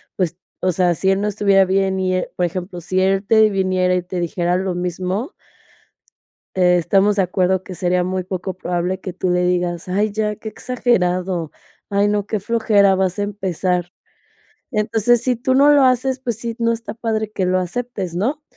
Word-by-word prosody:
pues", 175 -2 -1 0.2
o 185 - +2
sea, 180 0 +2
si 190 +3 0
él 195 0 +2
no 210 - 0
estuviera 200 -2 +3
bien 190 0 +1
y, 185 0 0
eh, 185 - -2
por 180 - +1
ejemplo, 175 +1 -5
si 185 +3 0
él 195 +1 +1
te 220 0 +5
viniera 185 -2 +1
y 180 - -1
te 180 0 -5
dijera 175 0 0
lo 185 -1 -2
mismo 180 - -3 1.2
te 180 -1 +4
estamos 195 +4 +2
de 195 - +3
acuerdo 185 +1 +1
que 185 - -9
sería 180 0 0
muy 185 0 -2
poco 185 0 -4
probable 180 +1 -2
que 185 -1 -6
tú 185 - -2
le 180 0 +2
digas: 175 -1 -1
"Ay, 205 +4 +1
ya, 210 0 -1
qué 220 - -7
exagerado. 185 -9 -1 0.4
Ay, 200 +1 +2
no, 205 -1 0
qué 215 -1 -2
flojera, 205 -2 +3
vas 190 0 0
a - - 0
empezar". 185 -3 -2 0.8
Entonces, 225 +2 +2
si 250 0 +1
tú 255 +3 0
no 280 +3 +6
lo 290 -2 +5
haces, 255 +1 +2
pues, 240 -4 -3
sí, 230 0 -5
no 230 0 +2
está 230 0 -6
padre 220 -2 -2
que 190 -3 -1
lo 185 0 +2
aceptes, 190 -1 -4
¿no? 265 +12 -1
190 Hz, 195 wpm, -20 LUFS, 180-215 Hz, 1.2 s, no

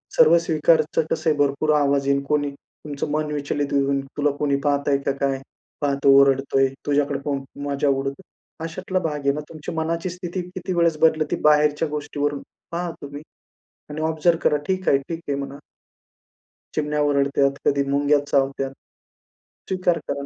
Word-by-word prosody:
सर्व 170 +2 +7
स्वीकारचं 160 -1 +2
कसं 160 - +1
आहे, 150 - +1
भरपूर 145 +2 +2
आवाज 140 -1 +1
येईल, 140 0 +2
कोणी 145 -1 +1
तुमचं 145 +1 -8
मन 150 0 -1
विचलित 145 -1 -2
होऊन 140 0 +2 0.2
तुला 145 0 +2
कोणी 145 -2 +1
पाहतंय 140 -1 +2
का - - +2
काय? 135 -1 0 0.4
पाहतो, 140 -1 +1
ओरडतोय 135 0 +3 0.2
तुझ्याकडे 145 -1 +1
पाहून 140 -2 -2 0.2
मजा 140 +1 0
उडवतो. 135 +4 -1 0.4
अशातला 185 +3 -2
भाग 155 -4 -2
आहे 140 -1 +2
ना. 150 - -4
तुमची 155 -2 -7
मनाची 165 +2 -2
स्थिती 180 +1 -5
किती 185 0 -3
वेळेस 170 -2 +2
बदलती 155 -2 +3
बाहेरच्या 150 +1 +4
गोष्टीवरून, 145 -1 -2 0.3
पहा 175 +1 -2
तुम्ही. 145 0 -8 0.7
आणि 150 +1 -5
ऑब्झर्व्ह 160 +1 +2
करा, 150 - +2
ठीक 185 0 -1
आहे, 135 - +5
ठीक 165 -1 -4
आहे 140 - +1
म्हणा. 140 0 -6 1.2
चिमण्या 150 0 0
ओरडत्यात, 140 -1 +2
कधी 140 0 +3
मुंग्या 145 +1 +3
चावतात. 135 -1 0 1.0
स्वीकार 185 -2 +1
करा. 140 0 -3
145 Hz, 155 wpm, -23 LUFS, 140-160 Hz, 1.2 s, सर्व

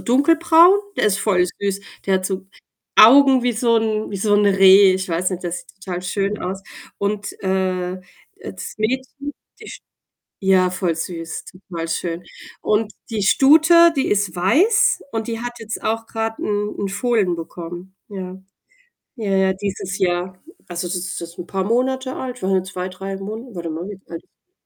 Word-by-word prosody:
dunkelbraun, 330 +7 +5 0.2
der - - +2
ist 200 -2 +1
voll 185 -4 +2 0.2
süß. 200 -1 -1 0.3
Der 195 - +2
hat 185 0 0
so 190 -1 -4 0.5
Augen 265 +3 +7
wie 245 - +2
so 230 +1 +2
'n 220 -1 -1
wie - - -2
so 205 +2 +1
'n 205 0 +3
Reh. 195 0 +7
Ich 190 0 -3
weiß 175 +2 0
nicht, 185 -1 -5
das 175 0 -3
sieht - - -20
total 180 -1 -5
schön 200 +3 -2
aus 190 +1 -5 0.4
und, 205 +1 -2
äh, 185 -1 -1 0.4
äh, - - -8
das 185 - -8
Mädchen, 260 +5 -3 0.3
die - - -10
sch - - -9 0.6
ja, 190 -1 +3
voll 180 -2 -1
süß, 165 0 -5
total 180 -3 -7
schön 165 +1 -3 0.4
und 215 0 0 0.2
die 220 -3 -2
Stute, 320 - +6
die 270 - 0
ist 200 -3 0
weiß 330 - +3
und 225 -1 -3
die 230 -1 -3
hat 240 0 -4
jetzt 225 -1 -6
auch 225 +1 -1
grad 225 0 -3
'n 210 0 -2
'n 200 - -2
Fohlen 200 -3 0
bekommen. 175 +3 -8
Ja, 190 -2 -7 0.8
ja, 210 -4 -3
ja, 190 0 +3
dieses 195 0 -4
Jahr. 180 0 -1 0.3
Also, 175 0 -4
das 180 - -3
ist 185 0 -4
jetzt 170 0 -9
'n 175 - -6
paar 190 -1 -2
Monate 260 +4 0
alt, 250 -2 -6
waren 190 +1 +1
ja 185 - +1
2, 185 -1 -5
3 195 +1 -6
Monate. 220 +5 -7
Warte 170 -1 -5
mal, 160 +2 -5
wie 200 -2 -8
alt 170 - -12
195 Hz, 180 wpm, -20 LUFS, 185-225 Hz, 0.8 s, Augen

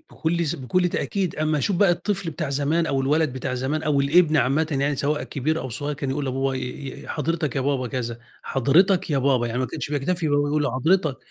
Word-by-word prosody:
بكل 170 +1 -1
ز 155 - -1
بكل 170 +5 0
تأكيد 190 0 -2
أمّا 155 0 +1
اشوف 185 +6 0
بقى 195 0 +4
الطفل 190 0 -1
بتاع 155 -2 -4
زمان، 145 +4 +1
أو 135 -3 0
الولد 145 +1 +1
بتاع 130 0 -3
زمان 135 +5 -2
أو 145 -2 +2
الابن 160 +3 +4
عامةً 145 +4 +2
يعني 140 0 0
سواء 145 +3 0
كبير 155 +4 -2
أو 130 - -5
صغيّر 145 +5 -3
كان 140 -1 -3
يقول 140 +1 -2
لباباه 135 +1 -1
ي - - -3 0.4
ي - - -12
حضرتك 155 -1 -2
يا - - +1
بابا 135 -1 0
كذا، 120 -1 -4 0.2
حضرتك 170 +9 +3
يا 145 - +2
بابا 130 -3 +2
يعني 120 +1 -3
ما 130 - 0
كانش - - -5
بيكتفي 160 +4 -1
إن 145 - 0
هو 145 - +3
بيقول 150 +1 0
له 145 - 0
حضرتك، 155 +1 +2
145 Hz, 230 wpm, -24 LUFS, 135-160 Hz, 0.4 s, بقى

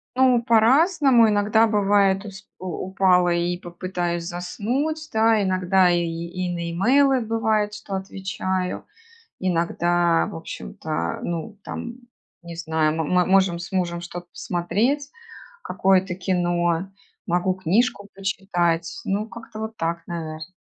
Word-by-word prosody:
Ну 255 -2 +4
по-разному, 255 - +5
иногда 210 +2 +3
бывает, 200 -2 +3
то - - -8
есть 195 +1 -11
у 185 - -8 0.2
упала 185 -2 +3
и 175 +1 0
попытаюсь 175 -1 -4
заснуть, 250 - -3
да, 220 0 +4
иногда 185 -1 +3
и, 175 0 +2
и 170 +2 -4
на 170 -1 -3
имейлы 260 +8 +3
бывает, 220 -2 0
что 210 -2 -6
отвечаю. 190 -1 -3 0.5
Иногда 175 -1 +1
в - - -8
общем-то, 80 +2 -5
ну 175 +5 -4
там 235 0 -6 0.5
не 170 -1 -9
знаю, 160 -2 0
м 160 0 -1
мы 180 -1 +3
можем 190 -3 +3
с 175 - -8
мужем 175 -2 -1
что-то 175 0 -8
посмотреть, 225 +13 -1 0.5
какое-то 190 - +1
кино. 175 -1 0 0.4
Могу 180 +1 +1
книжку 200 +4 0
почитать, 175 -4 -1
ну 205 +3 -1
как-то 225 -1 -10
вот 220 0 -5
так 170 -3 -3
наверно. 160 0 -6
185 Hz, 130 wpm, -23 LUFS, 175-215 Hz, 0.5 s, по-разному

